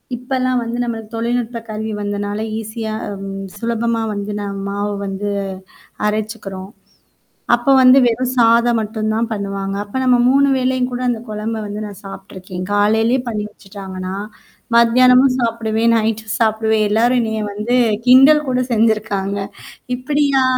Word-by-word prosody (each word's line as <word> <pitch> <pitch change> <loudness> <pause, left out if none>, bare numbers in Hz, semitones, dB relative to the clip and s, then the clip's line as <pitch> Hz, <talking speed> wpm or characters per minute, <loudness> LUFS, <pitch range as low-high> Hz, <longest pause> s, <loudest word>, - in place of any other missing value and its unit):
இப்பல்லாம் 255 0 -1
வந்து 235 +1 -4
நம்மளுக்கு 225 -2 -5
தொழில்நுட்ப 235 0 -2
கருவி 220 +1 -4
வந்தனால 205 +1 -3 0.2
ஈஸியாம் 215 -2 -5 0.3
சுலபமா 230 +1 -1
வந்து 205 0 -4
ந 205 - -4 0.2
மாவு 205 +1 -2
வந்து 195 +1 -3 0.8
அரைச்சுக்கறோம். 210 -3 -3 0.9
அப்ப 275 - +2
வந்து 255 +1 +7
வெறும் 245 +2 0
சாதம் 235 0 +4
மட்டும் 215 0 -2
தான் 230 +1 0
பண்ணுவாங்க. 195 -2 -3
அப்ப 205 +5 -6
நம்ம 250 -1 +4
3 275 +2 +4
வேளையும் 255 0 0
கூட 245 0 -4
அந்த 235 -2 -1
குழம்ப 215 +1 -3
வந்து 205 +1 -5
நான் 205 -2 -9
சாப்பட்டுருக்கேன். 185 -2 -8
காலையிலேயே 220 +4 +2
பண்ணி 215 -3 -2
வச்சுட்டாங்கன்னா, 190 -2 -8 0.6
மதியானமும் 250 +2 +5
சாப்பிடுவேன், 230 -1 +1
நைட்டும் 220 -1 -1
சாப்பிடுவேன் 220 -1 +2
எல்லாரும் 240 +4 +3
எனைய 220 -1 -2
வந்து 215 +4 -1 0.3
கிண்டல் 275 +4 +7
கூட 255 0 +1
செஞ்சிருக்காங்க. 215 -3 +1 0.6
இப்படியா? 275 +1 +1
220 Hz, 130 wpm, -18 LUFS, 205-245 Hz, 0.9 s, வந்து